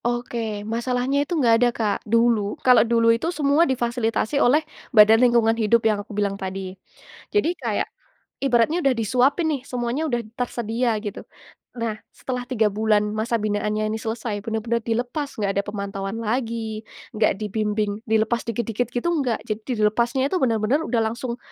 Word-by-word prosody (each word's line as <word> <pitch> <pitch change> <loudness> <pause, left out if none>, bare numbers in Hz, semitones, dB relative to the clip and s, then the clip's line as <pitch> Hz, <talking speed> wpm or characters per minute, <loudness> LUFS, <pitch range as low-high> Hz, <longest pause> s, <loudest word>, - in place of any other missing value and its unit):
Oke, 235 -3 -2
masalahnya 245 +4 -1
itu, 310 +4 -2
enggak 240 -6 +4
ada, 245 - +5
Kak, 210 -3 +1
dulu, 230 -3 +2
kalau 250 -1 +7
dulu 230 0 +3
itu, 230 +9 -1
semua 300 -1 +2
difasilitasi 240 +1 0
oleh 300 +6 +4 0.3
badan 220 +2 +8
lingkungan 235 -2 +4
hidup, 225 0 +3
yang 215 -2 +2
aku 205 0 -10
bilang 200 -1 -1
tadi. 190 0 -5 0.6
Jadi, 415 -5 +3
kayak, - - 0 0.6
ibaratnya 270 +5 +3
udah 270 -2 +3
disuapin 255 - +2
nih, 275 - -3
semuanya 245 +4 -2
udah 240 -2 0 0.2
tersedia 235 -1 -1
gitu. 205 - -5 0.6
Nah, 230 -2 -2 0.2
setelah 250 -1 -4
3 225 -4 +2
bulan 215 0 +2 0.2
masa 230 +2 0
binaannya 215 0 -1
ini 220 - -3
selesai, 220 -2 -3
benar-benar 230 +1 -1
dilepas, 245 +6 -2
nggak 200 -2 0
ada - - 0
pemantauan 200 0 -4
lagi, 225 -1 -2 0.3
nggak 215 0 +3
dibimbing, 210 0 -1
dilepas 220 +2 +2
dikit-dikit 230 +1 -2
gitu, 245 - -2 0.2
nggak 235 -4 -2
jadi 215 +1 -2 0.2
dilepasnya 235 +5 +1
itu, - - +3
benar-benar 230 +4 +2
udah 235 -2 +1
langsung 240 -1 -5
230 Hz, 155 wpm, -23 LUFS, 215-245 Hz, 0.6 s, badan